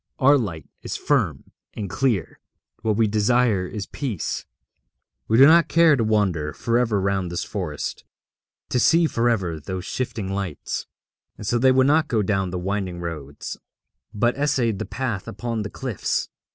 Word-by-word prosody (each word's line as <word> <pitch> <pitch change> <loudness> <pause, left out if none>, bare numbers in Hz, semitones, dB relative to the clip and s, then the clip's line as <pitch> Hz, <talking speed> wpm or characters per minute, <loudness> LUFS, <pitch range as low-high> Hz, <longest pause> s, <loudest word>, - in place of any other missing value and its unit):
Our 140 +1 +6
light 90 - -3
is - - -4
firm - - 0 0.2
and 105 - -4
clear. 110 -2 -1 0.4
What 110 -2 +1
we 115 +1 +3
desire 110 -2 +2
is 100 +1 -5
peace; 120 - -4 0.8
we 110 - +3
do 135 - +9
not 165 +1 +6
care 165 -2 +5
to 120 - 0
wander 95 -9 +1
for 115 0 0
ever 110 -5 +1
round 95 -2 0
this 85 - -3
forest, - - -4 0.7
to 125 - +1
see 165 +6 +5
for 120 -6 +1
ever 90 -8 -1
those 95 +4 -5
shifting 110 -6 -3
lights.' 95 -6 -4 0.5
And - - -8
so 120 +3 +1
they 130 +2 +5
would 130 0 +4
not 155 +2 +3
go 110 -6 +1
down 95 -1 0
the 90 - -4
winding 95 -1 -3
roads, 75 -5 -6 0.5
but 120 +3 +1
essayed 125 -8 +1
the - - -3
path 120 -7 -3
upon 115 -2 -3
the 105 - -4
cliffs. 130 -5 -2
110 Hz, 165 wpm, -23 LUFS, 95-125 Hz, 0.8 s, do